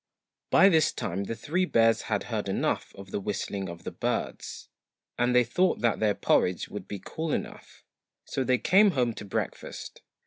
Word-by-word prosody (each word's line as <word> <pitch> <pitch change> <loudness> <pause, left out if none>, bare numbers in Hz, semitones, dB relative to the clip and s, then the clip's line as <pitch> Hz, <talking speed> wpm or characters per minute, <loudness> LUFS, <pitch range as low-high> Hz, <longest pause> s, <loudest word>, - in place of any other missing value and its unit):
By 190 - +7
this 160 -5 +4
time 95 +2 -3
the 115 - -4
three 175 +10 0
bears 115 -7 +3
had - - 0
heard - - -3
enough - - -1
of 95 -1 -11
the - - -1
whistling 100 -1 -3
of 85 0 -9
the - - -5
birds, - - -3 0.5
and 120 0 +2
they 125 - +6
thought 180 +11 +1
that 115 -1 +2
their 105 -2 +2
porridge 90 -1 +1
would 100 -2 -7
be 100 - -5
cool 160 - -4
enough; - - -5 0.4
so 135 - -2
they 130 0 +2
came 195 - +5
home 120 -2 +2
to 105 - -8
breakfast. 100 - -5
115 Hz, 180 wpm, -28 LUFS, 100-155 Hz, 0.5 s, By